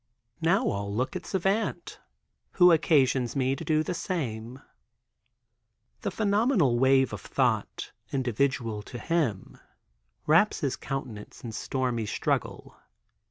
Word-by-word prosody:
Now, 190 +9 +2
all 100 0 -2
look 125 - -2
at 180 -1 -6
Savant, 195 +3 -1 0.6
which 180 -2 +7
occasions 135 -6 +2
me 135 0 +1
to 150 - -7
do 155 -1 +1
the 180 - -3
same. 130 - -4 1.4
The - - -1
phenomenal 200 - +2
wave 130 0 +4
of - - -6
thought, - - -1 0.2
individual 125 -3 -1
to 120 - -9
him, 125 - -2 0.7
wraps 170 +7 +3
his 140 -4 0
countenance 125 -7 -7
in 115 - -5
stormy 120 -1 -2
struggle. - - -2
135 Hz, 115 wpm, -27 LUFS, 120-170 Hz, 1.4 s, which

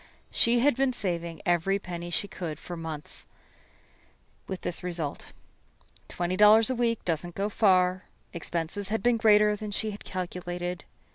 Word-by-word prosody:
She 235 +1 +3
had 290 0 +4
been 265 0 +1
saving 170 -6 -4
every 175 +2 +2
penny 175 -3 -6
she 175 +4 -1
could 170 -5 -5
for 175 - -7
months, 160 -3 -7 1.2
with 190 -1 -5
this 175 - -3
result. 170 -5 -4 0.8
Twenty 175 +1 -2
dollars 215 +4 +7
a - - 0
week 235 -2 0
doesn't 170 +1 -2
go 200 +1 -1
far. 185 -3 +3 0.3
Expenses 170 +3 -3
had 220 -2 -1
been 240 -1 +4
greater 210 -2 +5
than 210 0 -6
she 215 +1 -2
had 205 - -9
calculated. 180 -1 -4
185 Hz, 150 wpm, -28 LUFS, 175-210 Hz, 1.2 s, dollars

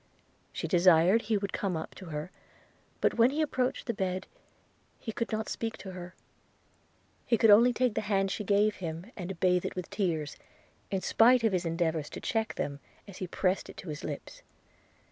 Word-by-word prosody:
She - - -4
desired 180 +3 +5
he 215 -1 0
would 200 -1 -4
come 190 -4 -1
up 160 - -6
to 190 - -11
her; 155 +1 -5 0.7
but - - +1
when 230 +2 +7
he 290 +3 -3
approached 255 -4 -1
the 235 - -1
bed, 190 -2 -2 0.7
he 225 - -5
could 230 +2 -3
not 220 0 -2
speak 225 -1 -3
to 190 - -8
her 180 0 -9 0.5
– - - -38
he 235 - +3
could 220 0 +6
only 235 +4 +7
take 245 -1 +1
the - - -1
hand 195 -2 +1
she 210 - -3
gave 205 +1 +2
him, 170 +4 -6
and 180 -2 -6
bathe 180 -1 +3
it - - -4
with 180 -1 -6
tears, 165 -7 -1 0.5
in 195 -1 -1
spite 240 +4 +5
of 220 -3 +3
his 180 -2 0
endeavours 165 -2 -1
to - - -7
check 225 -3 -1
them, 140 -1 -3 0.3
as 200 - -10
he 185 - -4
pressed 185 +2 0
it - - -11
to 180 - -8
his 150 -1 -6
lips. 145 -2 -6
195 Hz, 200 wpm, -30 LUFS, 175-220 Hz, 0.7 s, when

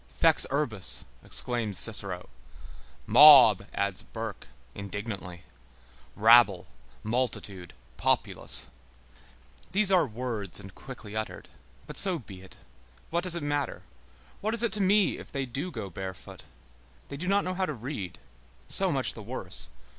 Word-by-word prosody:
Fex - - +3
urbis, 130 -9 -2 0.2
exclaims 115 -5 -1
Cicero; 100 -5 0 0.8
mob, 125 -10 +8
adds 100 -2 -1
Burke, 110 -7 -8 0.3
indignantly; 100 -3 -7 0.7
rabble, 110 -4 +5 0.4
multitude, 105 -6 -3 0.2
populace. - - 0 1.0
These 200 +2 +2
are 175 -5 +4
words 110 -6 -3
and 95 -1 -11
quickly 110 -5 -11
uttered. 110 0 -6 0.4
But - - -3
so 190 -3 +4
be 100 - -12
it. 95 - -13 0.5
What 170 +1 -1
does 180 -2 +4
it 170 - -4
matter? 145 -1 -3 0.6
What 215 +3 -2
is 235 - +5
it 235 - +1
to 210 - +2
me 200 +1 +2
if - - -12
they 135 -2 -3
do 135 +8 -5
go 110 - -7
barefoot! 95 +1 -8 0.7
They 140 - -7
do 180 +5 -6
not 200 +1 +2
know 185 - -3
how 185 0 -2
to 155 - -3
read; 115 - -6 0.5
so - - +3
much - - -1
the - - -10
worse. - - 0
120 Hz, 140 wpm, -27 LUFS, 100-155 Hz, 1.0 s, mob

